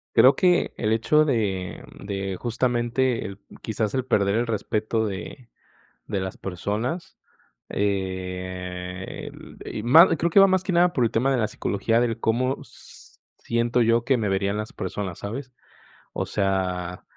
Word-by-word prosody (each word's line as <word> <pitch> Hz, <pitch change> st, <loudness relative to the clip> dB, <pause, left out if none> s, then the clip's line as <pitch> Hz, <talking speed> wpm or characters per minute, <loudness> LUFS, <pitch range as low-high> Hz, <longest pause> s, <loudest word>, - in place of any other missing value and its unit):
Creo 135 Hz, +2 st, +7 dB
que 180 Hz, -1 st, +2 dB
el 110 Hz, -1 st, +1 dB
hecho 150 Hz, +7 st, +3 dB
de 100 Hz, -, -1 dB, 0.2 s
de 95 Hz, -2 st, -3 dB
justamente 120 Hz, -2 st, 0 dB, 0.3 s
quizás 110 Hz, 0 st, -2 dB
el 130 Hz, -1 st, 0 dB
perder 100 Hz, -3 st, +2 dB
el 120 Hz, -, +1 dB
respeto 110 Hz, 0 st, -1 dB
de 115 Hz, +5 st, -7 dB, 0.6 s
de 100 Hz, -, -2 dB
las 95 Hz, 0 st, -4 dB
personas, 105 Hz, -, -4 dB, 0.5 s
eh, 95 Hz, -2 st, -4 dB, 0.3 s
y 105 Hz, -, -5 dB
ma 160 Hz, -, +8 dB
creo 170 Hz, +3 st, +1 dB
que 195 Hz, -, +5 dB
va 195 Hz, -, +9 dB
más 190 Hz, -1 st, +2 dB
que 190 Hz, -, -2 dB
nada 175 Hz, 0 st, +4 dB
por 125 Hz, -, +1 dB
el 115 Hz, -, +3 dB
tema 130 Hz, +4 st, +2 dB
de 130 Hz, -, +2 dB
la 110 Hz, -3 st, +1 dB
psicología 115 Hz, +2 st, 0 dB
del 120 Hz, -2 st, 0 dB
:"¿Cómo 130 Hz, +4 st, 0 dB
siento 120 Hz, +1 st, -4 dB
yo 115 Hz, +1 st, +3 dB
que 130 Hz, -2 st, +3 dB
me 105 Hz, -3 st, -1 dB
verían 100 Hz, +1 st, 0 dB
las 110 Hz, 0 st, -4 dB
personas?", 95 Hz, -1 st, -4 dB
¿sabes?, 125 Hz, +6 st, -6 dB, 0.6 s
o -, -, -2 dB
sea, 90 Hz, -2 st, -1 dB
110 Hz, 150 wpm, -24 LUFS, 95-125 Hz, 0.6 s, va